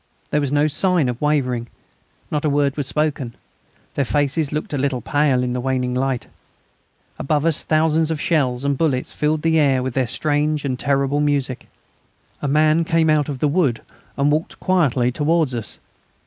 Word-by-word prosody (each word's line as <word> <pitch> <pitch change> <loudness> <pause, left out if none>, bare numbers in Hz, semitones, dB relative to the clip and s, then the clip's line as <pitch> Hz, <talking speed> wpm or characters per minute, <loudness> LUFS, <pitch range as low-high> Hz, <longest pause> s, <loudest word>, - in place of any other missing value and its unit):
There 150 - +2
was 140 -2 -1
no 145 +1 +3
sign 170 0 +2
of 120 0 -5
wavering; 125 -6 0 0.6
not 150 -1 -1
a 155 - +2
word 140 -1 +1
was 145 -3 -3
spoken; 150 -6 -2 0.6
their 140 - 0
faces 145 +2 0
looked 150 0 -4
a - - 0
little 135 -2 0
pale 145 -2 +1
in 125 -1 -2
the 125 - -2
waning 130 -1 -1
light. 130 -1 -1 0.9
Above 150 +1 0
us 165 -2 +1
thousands 160 0 +2
of 160 -2 -2
shells 135 -6 0
and 140 -1 0
bullets 140 -6 0
filled 150 0 0
the 160 -1 +3
air 135 -4 +2
with 130 -1 -3
their 130 -1 0
strange 150 +2 0
and 130 -2 -2
terrible 140 0 +1
music. 140 -4 -1 0.7
A 145 - -1
man 155 +3 +3
came 165 -1 +2
out 150 -1 +1
of 140 - -3
the 150 - +1
wood 145 -7 +1 0.3
and 140 +1 +2
walked 155 +2 -2
quietly 135 -10 +2
towards 150 0 +1
us. 115 -3 -5
145 Hz, 180 wpm, -20 LUFS, 130-155 Hz, 0.9 s, no